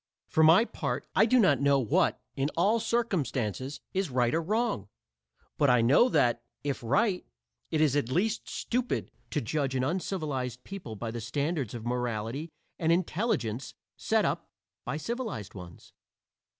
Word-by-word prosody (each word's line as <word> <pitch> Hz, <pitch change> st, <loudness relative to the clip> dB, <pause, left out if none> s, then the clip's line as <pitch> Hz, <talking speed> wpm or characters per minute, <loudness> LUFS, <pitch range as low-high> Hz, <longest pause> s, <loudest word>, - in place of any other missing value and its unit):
For 160 Hz, -, +1 dB
my 165 Hz, +8 st, +7 dB
part, -, -, -3 dB
I 220 Hz, -, +5 dB
do 255 Hz, -, +4 dB
not 145 Hz, -, +4 dB
know 140 Hz, 0 st, +4 dB
what, 120 Hz, -5 st, +2 dB, 0.2 s
in 135 Hz, +2 st, 0 dB
all 210 Hz, +7 st, +3 dB
circumstances, 145 Hz, -, -1 dB
is 190 Hz, -3 st, 0 dB
right 125 Hz, -2 st, +1 dB
or 165 Hz, -, +2 dB
wrong; 210 Hz, -, -1 dB, 0.7 s
but 145 Hz, -, +4 dB
I 125 Hz, -1 st, +5 dB
know 140 Hz, -, +5 dB
that, 120 Hz, -, +2 dB, 0.2 s
if 140 Hz, -1 st, -2 dB
right, 185 Hz, -, +1 dB, 0.5 s
it 155 Hz, -, +1 dB
is 145 Hz, -3 st, +3 dB
at 145 Hz, -5 st, +1 dB
least 205 Hz, +10 st, 0 dB
stupid, 245 Hz, 0 st, -2 dB, 0.2 s
to -, -, -1 dB
judge 135 Hz, +3 st, -1 dB
an 130 Hz, -, +1 dB
uncivilized 145 Hz, -6 st, -2 dB
people 190 Hz, -, -7 dB
by 115 Hz, +2 st, -4 dB
the 120 Hz, 0 st, -5 dB
standards 140 Hz, +1 st, -2 dB
of 115 Hz, -1 st, -7 dB
morality 120 Hz, +4 st, -2 dB, 0.3 s
and 165 Hz, -1 st, +2 dB
intelligence 160 Hz, -, -1 dB, 0.2 s
set -, -, +1 dB
up -, -, -2 dB, 0.4 s
by 130 Hz, +4 st, -2 dB
civilized 220 Hz, -, -4 dB
ones. 90 Hz, -3 st, -11 dB
145 Hz, 155 wpm, -29 LUFS, 120-190 Hz, 0.7 s, my